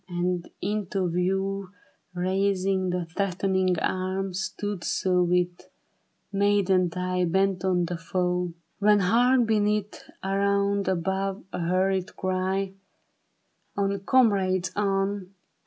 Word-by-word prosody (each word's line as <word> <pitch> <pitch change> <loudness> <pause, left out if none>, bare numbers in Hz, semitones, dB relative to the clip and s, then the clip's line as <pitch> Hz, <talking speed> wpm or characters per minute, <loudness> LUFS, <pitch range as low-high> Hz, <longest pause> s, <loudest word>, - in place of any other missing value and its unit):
And 175 0 -2
into 195 -3 -1
view 195 +2 -1 0.5
Raising 190 0 +1
his 175 -2 -3
threatening 190 -1 +1
arm, 185 +2 -1
stood 195 0 -4
so 180 -1 +1
With 180 0 0 0.6
maddened 195 -3 +2
eye 180 0 0
bent 190 +1 +1
on 180 -2 +2
the 175 0 -4
foe. 180 0 -1 0.3
When 210 0 +4
hark, 240 +6 +4
beneath, 210 -1 0 0.2
around, 200 +1 +1
above, 190 +2 -1
A - - -3
hurried 185 +2 0
cry, 190 +1 -1 0.5
" - - -43
On, 200 0 0
comrades, 195 -5 +2
on 195 -1 -1
190 Hz, 105 wpm, -26 LUFS, 180-200 Hz, 0.6 s, When